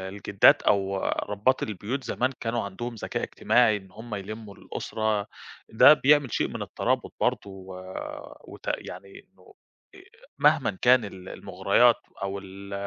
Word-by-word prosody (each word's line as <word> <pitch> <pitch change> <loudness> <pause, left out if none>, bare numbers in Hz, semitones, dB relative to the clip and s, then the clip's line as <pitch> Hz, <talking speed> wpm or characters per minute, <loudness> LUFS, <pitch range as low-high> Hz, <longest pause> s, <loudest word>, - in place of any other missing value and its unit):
الجدّات 95 +1 +3
أو 100 -1 +1
ربّات 105 +6 0
البيوت 110 +6 -4
زمان 130 +2 -1
كانوا 115 0 -1
عندهم 120 +5 -6
ذكاء 110 - -4
اجتماعي 115 -4 +2
إن 95 -2 -11
هُم 110 0 -8
يلمّوا 105 +1 -7
الأسرة 110 -2 -3 0.4
ده 110 +6 +8
بيعمل 145 -3 +3
شيء - - 0
من - - -6
الترابط - - -2
برضه - - +1
و 95 -1 -10 0.7
وتأ - - -5
يعني 100 0 -10
إنه 90 -1 -20 0.4
أ - - -14 0.4
مهمًا 150 -4 +4
إن 95 - -13
كان 125 -2 +5
ال 95 -2 -9
المُغريات 100 +5 +2 0.3
أو 100 0 -3
ال 100 +1 -11
105 Hz, 145 wpm, -26 LUFS, 95-120 Hz, 0.7 s, ده